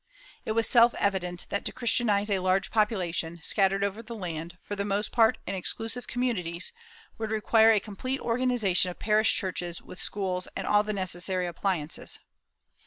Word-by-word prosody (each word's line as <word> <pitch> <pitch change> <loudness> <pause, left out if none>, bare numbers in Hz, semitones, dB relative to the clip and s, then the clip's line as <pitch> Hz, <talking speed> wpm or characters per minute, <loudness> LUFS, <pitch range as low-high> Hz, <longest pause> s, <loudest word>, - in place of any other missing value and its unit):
It 220 - -1
was 230 0 +2
self 235 -1 +5
evident 180 -3 -1
that 200 - -2
to - - 0
Christianize 220 -4 +1
a 195 - +2
large 185 +1 +1
population, 180 -6 0
scattered 195 +1 +3
over 200 +2 -2
the 235 0 -8
land, 170 -3 -6
for 205 - -6
the 200 - -2
most 205 +1 -1
part 225 -2 +4
in - - -3
exclusive 225 +6 -4
communities, 195 -8 -2 0.5
would 220 -1 -2
require 220 +1 +4
a 215 - +4
complete 230 +7 -4
organization 230 -7 +1
of 175 - -8
parish 215 +1 +3
churches 175 -3 -3
with 185 - -11
schools 185 -3 -2
and - - -3
all 205 0 +4
the 210 0 -3
necessary 185 -1 0
appliances. 170 -2 -2
200 Hz, 170 wpm, -28 LUFS, 180-225 Hz, 0.5 s, self